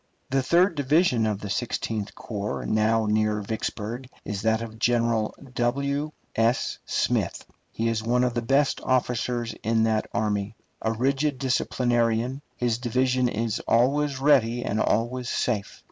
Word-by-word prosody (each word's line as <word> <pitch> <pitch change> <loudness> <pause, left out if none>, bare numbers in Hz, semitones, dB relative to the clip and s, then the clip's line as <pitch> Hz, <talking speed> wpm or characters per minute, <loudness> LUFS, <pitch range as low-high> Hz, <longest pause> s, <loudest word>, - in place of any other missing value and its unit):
The 135 0 +3
third 175 +7 +3
division 145 -5 +2
of 105 -1 -2
the 105 - -5
Sixteenth 110 -1 -2
Corps 105 -2 -4
now 110 +1 +2
near 105 0 +1
Vicksburg 110 +3 -4 0.2
is 100 -1 -3
that 110 +1 +1
of 110 -1 -9
General 115 -2 +1 0.2
W. 140 +5 0 0.2
S. 115 +3 +1
Smith. - - 0 0.3
He 115 - -1
is 115 -1 0
one 120 +3 +2
of 125 -1 +1
the 120 - -1
best 135 +4 +2
officers 125 -2 0
in 110 0 +2
that 110 -1 +1
army. 105 -1 -1 0.3
A 110 - 0
rigid 135 +4 0
disciplinarian, 120 -1 0
his 120 -2 0
division 125 +1 +1
is 115 -1 -1
always 135 +4 +2
ready 125 -4 +3
and 105 - -1
always 120 +4 0
safe. 110 -5 -1
120 Hz, 145 wpm, -26 LUFS, 110-130 Hz, 0.3 s, The